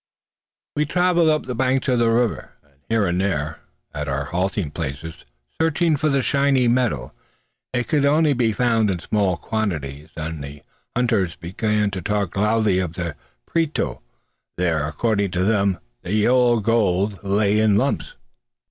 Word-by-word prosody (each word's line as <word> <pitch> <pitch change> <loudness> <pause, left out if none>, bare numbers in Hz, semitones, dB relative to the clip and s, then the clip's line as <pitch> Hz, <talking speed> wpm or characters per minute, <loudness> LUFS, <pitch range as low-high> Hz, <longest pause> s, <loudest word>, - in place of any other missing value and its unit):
We 150 0 +1
travelled 175 -1 +3
up 155 -1 +2
the 125 - -3
banks 130 +2 0
of 125 -2 +2
the 115 -1 +3
river, 115 -1 0
and 70 -2 -32
here 115 -2 +2
and 90 0 0
there, 75 -6 -2 0.3
at - - -4
our 70 +1 -1
halting 90 +1 -2
places, 75 +3 -6 0.4
searching 165 0 +2
for 155 +2 0
the 140 -2 +1
shining 135 -4 +3
metal. 125 -2 -1 0.6
It 125 -1 -1
could 150 -3 +2 0.3
be 120 -2 +2
found 115 -1 +2
only - - +2
in 90 - -5
small 100 -5 +1
quantities, 80 -9 -3
and 80 -2 -4
the 70 0 -9 0.3
hunters 110 -9 +1
began 105 +4 -1
to 95 -2 -4
talk 100 -1 -1
loudly 105 -1 +2
of 90 -3 -2
the 85 -3 -4 0.3
Prieto. 165 - -1 0.6
There, 85 -4 +1
according 100 +5 0
to 90 - +2
them, 100 -2 +2 0.2
the 90 - -4
yellow 120 +2 +3
gold 100 -3 +1
lay 100 +1 +2
in 110 -2 +4
lumps. 140 - -1
105 Hz, 155 wpm, -22 LUFS, 90-125 Hz, 0.6 s, in